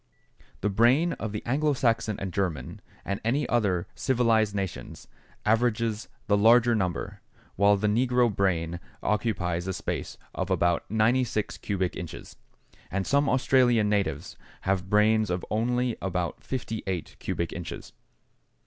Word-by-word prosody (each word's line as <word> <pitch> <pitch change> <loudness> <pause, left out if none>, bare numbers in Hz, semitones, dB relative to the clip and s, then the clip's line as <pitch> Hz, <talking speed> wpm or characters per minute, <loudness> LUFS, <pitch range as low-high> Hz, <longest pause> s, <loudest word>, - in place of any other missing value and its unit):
The 105 - +1
brain 125 - +4
of 110 - -3
the 105 - -5
Anglo 145 +4 +1
Saxon 115 -4 0
and 95 -2 -4
German, 80 -10 -3 0.2
and 100 0 -3
of 115 +3 +1
other 100 -7 +1
civilized 115 -5 +2
nations, 95 -3 -5 0.4
averages 115 -1 +1 0.2
the 100 - +3
larger 115 +3 +5
number, 90 -6 -2 0.3
while 100 0 +4
the 105 - -2
negro 120 0 +2
brain 85 -3 0 0.2
occupies 90 -5 -1
a 95 - -1
space - - -4 0.2
of - - -3
about 85 -1 +1
96 110 +1 +1
cubic 95 -3 -2
inches, 85 -3 -8 0.5
and 95 0 -2
some 140 0 +2
Australian 125 -4 +3
natives 90 -9 -1 0.2
have 95 0 -1
brains 110 0 +3
of 90 0 -2
only 120 +2 0
about 90 -3 -3
58 110 -8 -4
cubic 85 - -3
inches. 90 -1 -7
105 Hz, 130 wpm, -27 LUFS, 95-120 Hz, 0.5 s, larger